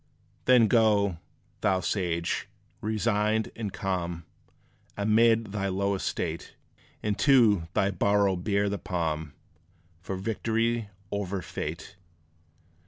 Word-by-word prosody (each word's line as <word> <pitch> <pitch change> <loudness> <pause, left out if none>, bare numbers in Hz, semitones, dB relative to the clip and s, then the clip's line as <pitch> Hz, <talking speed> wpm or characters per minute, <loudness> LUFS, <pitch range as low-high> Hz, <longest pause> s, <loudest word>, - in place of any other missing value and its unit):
Then 125 -3 +6
go, 105 -6 +3 0.4
thou 95 -1 +2
sage, 85 -2 -1 0.3
resigned 110 0 0
and 110 -3 -4
calm; 90 -4 -3 0.7
Amid 110 +1 +3
thy 100 -1 -2
low 100 +1 0
estate, 95 - -3 0.5
And 105 -1 -1
to 110 - +5
thy 100 -2 +2
burrow 100 +1 +2
bear 100 +3 0
the 100 -1 -2
palm 80 -4 -2 0.7
For 95 +2 -4
victory 115 +2 -1 0.2
over 100 -2 -3
fate. 80 +7 -6
100 Hz, 105 wpm, -28 LUFS, 95-110 Hz, 0.7 s, Then